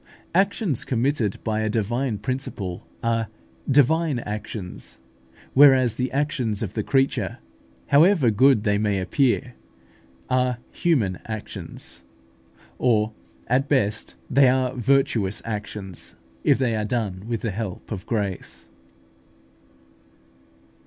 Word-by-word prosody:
Actions 190 Hz, -, +1 dB
committed 125 Hz, -4 st, 0 dB
by 110 Hz, -1 st, -1 dB
a 110 Hz, 0 st, 0 dB
divine 115 Hz, +2 st, -1 dB
principle 105 Hz, -6 st, -4 dB, 0.2 s
are 115 Hz, -1 st, +1 dB, 0.4 s
divine 145 Hz, +2 st, +3 dB
actions; 105 Hz, -4 st, -6 dB, 0.6 s
whereas 130 Hz, -4 st, +6 dB
the 130 Hz, 0 st, -2 dB
actions 130 Hz, -7 st, -1 dB
of 100 Hz, -2 st, -4 dB
the 110 Hz, -, -1 dB
creature, 135 Hz, +5 st, +1 dB, 0.5 s
however 150 Hz, -, +5 dB
good 125 Hz, +1 st, +4 dB
they 105 Hz, -2 st, +2 dB
may 105 Hz, -2 st, +1 dB
appear, 125 Hz, +5 st, +1 dB, 0.7 s
are 125 Hz, -1 st, +1 dB
human 115 Hz, -, +1 dB
actions 110 Hz, -, -6 dB, 0.8 s
or 110 Hz, -3 st, +2 dB, 0.3 s
at 135 Hz, +3 st, +1 dB
best 110 Hz, -7 st, 0 dB
they 135 Hz, 0 st, +5 dB
are 130 Hz, 0 st, +1 dB
virtuous 125 Hz, -5 st, +1 dB
actions, 105 Hz, -4 st, -5 dB, 0.3 s
if -, -, +4 dB
they 125 Hz, -4 st, +1 dB
are 105 Hz, -, -1 dB
done 105 Hz, -4 st, -2 dB
with 115 Hz, -2 st, -2 dB
the 115 Hz, -, -1 dB
help 100 Hz, 0 st, -5 dB
of 95 Hz, -4 st, -5 dB
grace. 100 Hz, -, -3 dB
115 Hz, 110 wpm, -24 LUFS, 105-135 Hz, 0.8 s, whereas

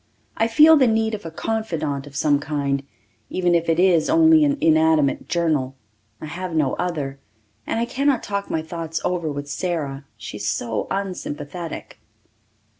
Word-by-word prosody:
I 225 Hz, -, +2 dB
feel 305 Hz, +7 st, +7 dB
the 260 Hz, -3 st, +4 dB
need 220 Hz, 0 st, +1 dB
of 205 Hz, -5 st, -5 dB
a -, -, -5 dB
confidant 160 Hz, -8 st, -3 dB
of 140 Hz, -, -13 dB
some 145 Hz, 0 st, +2 dB
kind, 140 Hz, -2 st, -1 dB, 0.5 s
even 180 Hz, -1 st, +1 dB
if 170 Hz, -1 st, +1 dB
it 165 Hz, +1 st, +2 dB
is 180 Hz, -, +4 dB
only 320 Hz, 0 st, +6 dB
an 290 Hz, -1 st, +2 dB
inanimate 160 Hz, -3 st, +3 dB
journal. 155 Hz, -6 st, 0 dB, 0.4 s
I -, -, -7 dB
have 175 Hz, +2 st, -5 dB
no 145 Hz, -4 st, +2 dB
other. 150 Hz, -6 st, -3 dB, 0.5 s
And -, -, -1 dB
I 235 Hz, -, +1 dB
cannot 270 Hz, +1 st, 0 dB
talk 200 Hz, 0 st, -3 dB
my 160 Hz, -, -1 dB
thoughts 165 Hz, 0 st, -4 dB
over 170 Hz, -4 st, -1 dB
with 145 Hz, 0 st, -5 dB
Sara 145 Hz, -3 st, -3 dB
she 105 Hz, 0 st, -7 dB
is 105 Hz, 0 st, -4 dB
so 110 Hz, +1 st, -2 dB
unsympathetic. 175 Hz, -4 st, -5 dB
165 Hz, 165 wpm, -22 LUFS, 145-200 Hz, 0.5 s, feel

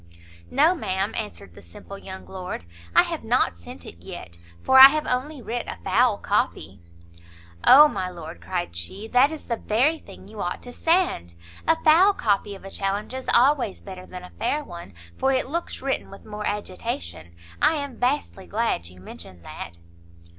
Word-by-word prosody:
"No, 305 Hz, +6 st, +4 dB
ma'am," 195 Hz, -, -2 dB
answered 205 Hz, -, -6 dB
the 100 Hz, -, -14 dB
simple 85 Hz, -, -11 dB
young 190 Hz, -1 st, -9 dB
lord, 185 Hz, -, -7 dB, 0.3 s
"I -, -, +8 dB
have -, -, -5 dB
not -, -, +1 dB
sent 85 Hz, +1 st, -11 dB
it 85 Hz, -, -10 dB
yet, 85 Hz, -1 st, -9 dB, 0.2 s
for 265 Hz, 0 st, +6 dB
I 265 Hz, -, +14 dB
have 305 Hz, +2 st, -1 dB
only 260 Hz, +2 st, -2 dB
writ 235 Hz, +1 st, -4 dB
a -, -, -6 dB
foul -, -, +3 dB
copy." 95 Hz, 0 st, -1 dB, 0.8 s
"O 295 Hz, +4 st, +9 dB
my 190 Hz, -9 st, -3 dB
lord," 160 Hz, -, -9 dB
cried 85 Hz, 0 st, -4 dB
she, 190 Hz, -, -4 dB
"that 255 Hz, +4 st, +5 dB
is 315 Hz, -1 st, -8 dB
the 235 Hz, -, -2 dB
very 265 Hz, +11 st, +1 dB
thing 195 Hz, -1 st, -14 dB
you 210 Hz, 0 st, -8 dB
ought 175 Hz, -, -4 dB
to 245 Hz, -, -9 dB
send! 325 Hz, -, +1 dB, 0.3 s
a 325 Hz, -, +5 dB
foul 350 Hz, +6 st, +6 dB
copy 205 Hz, -, 0 dB
of 195 Hz, -, -13 dB
a 195 Hz, -, -8 dB
challenge 200 Hz, +5 st, -3 dB
is 260 Hz, 0 st, -6 dB
always 255 Hz, -4 st, +3 dB
better 185 Hz, -2 st, -10 dB
than 180 Hz, 0 st, -9 dB
a 180 Hz, -, -11 dB
fair 295 Hz, +6 st, 0 dB
one, 170 Hz, -, -10 dB, 0.2 s
for 270 Hz, -, +2 dB
it 260 Hz, -, +1 dB
looks 330 Hz, 0 st, -4 dB
written 270 Hz, 0 st, -1 dB
with 195 Hz, -, -13 dB
more 210 Hz, -1 st, -5 dB
agitation. 85 Hz, -, -5 dB, 0.3 s
I -, -, +5 dB
am 285 Hz, -5 st, -5 dB
vastly 250 Hz, -7 st, -1 dB
glad 215 Hz, -, -1 dB
you 90 Hz, +1 st, -13 dB
mentioned 85 Hz, -1 st, -11 dB
that." 85 Hz, +2 st, -8 dB
205 Hz, 185 wpm, -24 LUFS, 170-265 Hz, 0.8 s, I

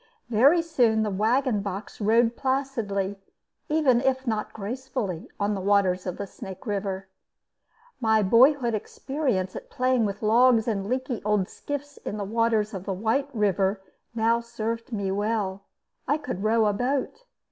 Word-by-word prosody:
Very 280 Hz, +10 st, +5 dB
soon 235 Hz, -9 st, +2 dB
the 210 Hz, -, -1 dB
wagon 220 Hz, +3 st, +1 dB
box 200 Hz, +2 st, -6 dB
rode 230 Hz, +3 st, +3 dB
placidly, 230 Hz, -8 st, -1 dB, 0.5 s
even 290 Hz, -6 st, +3 dB
if 265 Hz, 0 st, 0 dB
not 220 Hz, -3 st, -2 dB
gracefully, 220 Hz, -4 st, -4 dB
on 205 Hz, +1 st, +1 dB
the 195 Hz, -, -3 dB
waters 190 Hz, -2 st, +2 dB
of 180 Hz, -, -3 dB
the 200 Hz, -, -4 dB
Snake 190 Hz, -1 st, -10 dB
River. 195 Hz, -2 st, -3 dB, 0.9 s
My 220 Hz, -3 st, +3 dB
boyhood 240 Hz, +4 st, +5 dB
experience 225 Hz, -3 st, -2 dB
at -, -, -8 dB
playing 255 Hz, -2 st, +1 dB
with 205 Hz, +1 st, -4 dB
logs 230 Hz, +1 st, +4 dB
and 200 Hz, -4 st, -1 dB
leaky 255 Hz, -1 st, -2 dB
old 210 Hz, -3 st, +1 dB
skiffs 290 Hz, 0 st, -6 dB
in 210 Hz, -, -5 dB
the 205 Hz, -, -3 dB
waters 220 Hz, 0 st, +1 dB
of 190 Hz, 0 st, -6 dB
White 225 Hz, +9 st, 0 dB
River 200 Hz, -3 st, +1 dB, 0.4 s
now 230 Hz, +1 st, +2 dB
served 230 Hz, 0 st, -4 dB
me 200 Hz, -4 st, -2 dB
well; 200 Hz, -1 st, -1 dB, 0.4 s
I 290 Hz, +3 st, +2 dB
could 270 Hz, -11 st, -5 dB
row 220 Hz, +1 st, +3 dB
a 210 Hz, -, +2 dB
boat. 265 Hz, -, -2 dB
220 Hz, 150 wpm, -26 LUFS, 200-255 Hz, 0.9 s, Very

